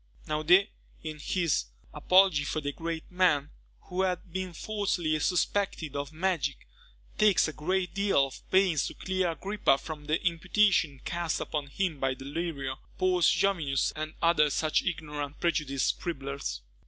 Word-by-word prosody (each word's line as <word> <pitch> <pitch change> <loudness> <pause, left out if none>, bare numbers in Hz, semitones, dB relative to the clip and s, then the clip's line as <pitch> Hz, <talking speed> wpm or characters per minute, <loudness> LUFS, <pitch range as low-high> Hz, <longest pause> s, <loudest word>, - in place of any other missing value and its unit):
Naudé, 170 +7 +4 0.3
in 155 -1 -6
his 165 - 0 0.3
"Apology 185 -5 +4
for 150 - -2
the 145 -1 -3
great 165 +2 -4
Men 165 -6 +2 0.3
who 180 +1 -3
have 180 -2 -2
been 185 -1 -3
falsely 175 -4 -1
suspected 180 -3 0
of 140 0 -3
Magic," 160 - -1 0.5
takes 210 -5 +5
a 155 - -5
great 180 +4 -1
deal 195 -8 +3
of 135 - -10
pains 185 -6 +3
to - - -8
clear 185 -1 -1
Agrippa 190 -4 +1
from 150 0 -8
the 155 +2 +1
imputations 170 -4 +2
cast 170 -1 -1
upon 150 -3 -3
him 160 +1 -2
by 135 -1 0
Delrio, 140 -1 -4 0.2
Paulus 185 -2 +3
Jovius, 155 -9 +1
and 155 0 -5
other 165 -3 +4
such 155 +2 +1
ignorant 150 -5 -4
and - - -23
prejudiced 150 -6 0
scribblers. 140 - -4
165 Hz, 145 wpm, -29 LUFS, 145-185 Hz, 0.5 s, takes